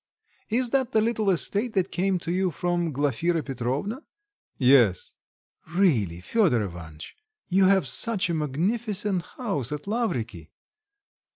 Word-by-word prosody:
"Is 240 +2 0
that 265 -2 +1
the 220 - +5
little 220 -2 +1
estate 205 +6 0
that 190 -1 0
came 185 +1 +1
to 170 - -3
you 185 +1 +1
from 175 0 -1
Glafira 150 +4 0
Petrovna?" 135 - -3 0.6
"Yes." 125 - +4 0.6
"Really, 110 - +2
Fedor 140 - +2
Ivanitch! 85 -5 -9 0.3
You 190 +1 +4
have 190 -3 +4
such 195 - 0
a 170 - -1
magnificent 190 - -1 0.2
house 195 - -2
at 150 0 -5
Lavriky." 120 - -2
175 Hz, 125 wpm, -26 LUFS, 130-210 Hz, 0.6 s, the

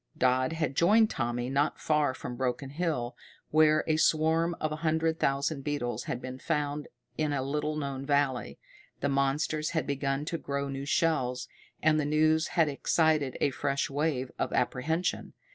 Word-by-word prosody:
Dodd 130 +3 +2
had 155 -4 -1
joined 215 +7 +5
Tommy 120 0 -2
not 140 +3 0
far 150 -4 +1
from 125 - -6
Broken 130 +2 -2
Hill, 145 -7 -2 0.4
where 155 0 +5
a 155 -1 +1
swarm 160 +2 +2
of 155 - -1
a 155 - -3
hundred 160 0 0
thousand 140 +1 0
beetles 145 -5 -2
had 120 - -3
been 130 0 -7
found 150 -1 -2 0.3
in 155 -1 +1
a 135 -2 -1
little 150 +2 -2
known 140 -3 -3
valley. 135 - 0 0.4
The 140 - +1
monsters 140 +3 0
had - - +1
begun 140 0 -1
to 165 0 -3
grow 140 0 -3
new 135 0 -5
shells, 135 -6 +1 0.4
and 155 0 +4
the 150 - 0
news 155 +2 +3
had 165 -2 +5
excited 150 -1 +1
a 140 - +2
fresh 140 +2 -1
wave 140 -3 -1
of - - -1
apprehension. 160 +8 -1
145 Hz, 165 wpm, -29 LUFS, 135-155 Hz, 0.4 s, joined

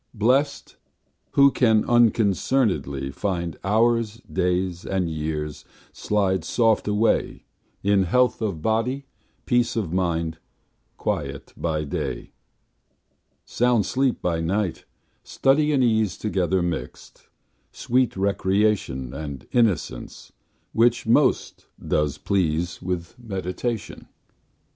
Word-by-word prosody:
Blest, 125 +7 +1 0.6
who 140 0 +6
can 110 -5 +3
unconcern'dly 100 - +1
find 85 -1 -2
Hours, 115 +1 +2
days, 90 -1 -1
and 95 -2 -1
years 75 -1 -4 0.3
slide 95 -3 0
soft 115 -3 +1
away 105 +2 +1 0.4
In 100 -1 +3
health 125 +7 +2
of 95 -8 -3
body, 125 +5 0 0.4
peace 120 -1 +1
of 100 -8 -2
mind, 85 -3 -1 0.6
Quiet - - -4
by 80 -2 -2
day, 70 - -4 1.1
Sound 120 -3 +2
sleep 130 -1 0
by 85 -2 0
night; 95 +2 -1 0.4
study 150 +3 +2
and 135 -3 +3
ease 110 -5 +1
Together 95 -3 0
mixt, 85 -2 -6 0.4
sweet 125 -3 0
recreation, 95 - 0
And 70 -3 -6
innocence, 115 -8 -1 0.4
which 120 +1 +3
most 130 +4 +1
does 75 -2 -1
please 85 -3 -1
With 90 +3 -4
meditation. 105 +1 -4
100 Hz, 100 wpm, -24 LUFS, 85-115 Hz, 1.1 s, who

